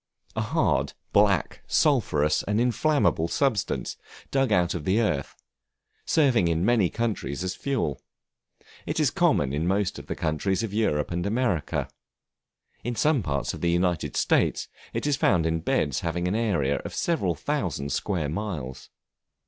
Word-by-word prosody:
A - - 0
hard, - - +1 0.2
black, 100 -5 +2
sulphurous 75 +1 +2
and 105 +2 -1
inflammable 125 - +2
substance, 120 +1 -1 0.3
dug 135 -3 +2
out 90 -3 +3
of 85 - -4
the 95 +7 +2
earth, 80 -12 -1 0.7
serving 130 - +3
in 85 +2 +1
many 110 -6 +3
countries 110 -9 -2
as 90 -1 -2
fuel. 130 - -2 0.9
It - - -1
is - - +3
common 65 - +2
in 80 +4 -1
most 100 +1 0
of - - -12
the - - -3
countries 90 +6 -1
of 105 -3 -4
Europe 80 -10 0
and 85 0 -1
America. 110 - 0 1.0
In 120 +1 -2
some 150 +1 +2
parts 70 -6 -2
of - - -8
the 85 - +1
United 85 -5 0
States, - - +2 0.2
it - - -3
is 145 -2 +1
found 90 - +3
in 80 0 +1
beds 70 -4 0
having 85 +1 -2
an 90 - 0
area 95 -12 +1
of - - -7
several 100 - 0
thousand 90 - -2
square 85 +1 -1
miles. 75 -7 -5
90 Hz, 155 wpm, -26 LUFS, 80-115 Hz, 1.0 s, out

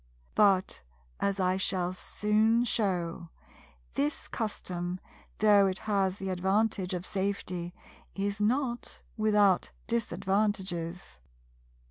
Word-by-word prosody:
But, 195 - +3 0.4
as 200 0 0
I 185 0 +2
shall 185 -1 0
soon 215 +5 +2
shew, 180 -7 -1 0.6
this 145 +2 -1
custom, 180 -5 -3 0.4
though 205 -2 +6
it 190 -1 -1
has 195 -3 +1
the 195 -1 -4
advantage 190 +1 +1
of 180 0 -5
safety, 185 -3 -3 0.4
is 200 +1 -2
not 240 +2 -1
without 210 -4 +3 0.2
disadvantages. 195 - -1
195 Hz, 95 wpm, -30 LUFS, 180-210 Hz, 0.6 s, though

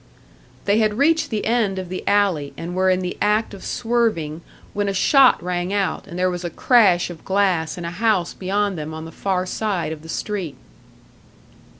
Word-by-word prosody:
They 205 +2 +3
had 215 -1 +2
reached 320 +4 +2
the 215 -3 -2
end 220 -4 +1
of 185 -1 -4
the 185 - -5
alley, 180 -9 +2
and 170 +1 -5
were 185 +1 +2
in 185 0 +2
the 180 -1 -3
act 210 +1 +1
of 195 - -10
swerving, 225 -10 -1 0.3
when 205 0 -1
a 195 - -2
shot 270 - +5
rang 180 +1 -2
out 200 -2 -1
and 170 - -8
there 185 0 +1
was 175 0 -5
a 175 - -2
crash 185 -3 +3
of 165 - -12
glass 190 -5 +1
in 175 - -5
a 170 - -4
house 190 -2 +1
beyond 195 -1 -1
them 155 +1 -5
on 160 0 -7
the 165 - -9
far 185 +2 -1
side 190 -4 -2
of 155 -1 -7
the 160 - -12
street. 180 -8 -4
190 Hz, 200 wpm, -21 LUFS, 175-210 Hz, 0.3 s, shot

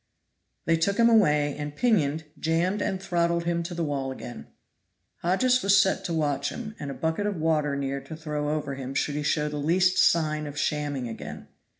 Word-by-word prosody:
They 165 0 +3
took 200 +5 +1
him 235 0 +5
away, 150 -10 +3
and 145 0 -5
pinioned, 160 -9 +2 0.2
jammed 170 +5 0
and 190 - -1
throttled 170 -2 0
him 170 0 0
to 170 +1 -5
the 170 - -1
wall 140 -3 -2
again. 120 - -8 0.7
Hodges 250 +9 +2
was 200 0 +5
set 190 - +2
to - - -3
watch 145 -3 0
him, 225 -2 -6
and 145 - -5
a 135 - -5
bucket 160 +6 -1
of 205 - -1
water 155 -3 +1
near 140 0 -2
to 160 - -7
throw 150 -2 -3
over 150 -2 -2
him 135 0 -6
should 145 - 0
he 150 - -2
show 150 0 +1
the 150 0 -4
least 180 +5 +2
sign 155 -2 +3
of 145 0 -8
shamming 145 -3 -1
again. 75 -9 -8
155 Hz, 200 wpm, -26 LUFS, 145-175 Hz, 0.7 s, him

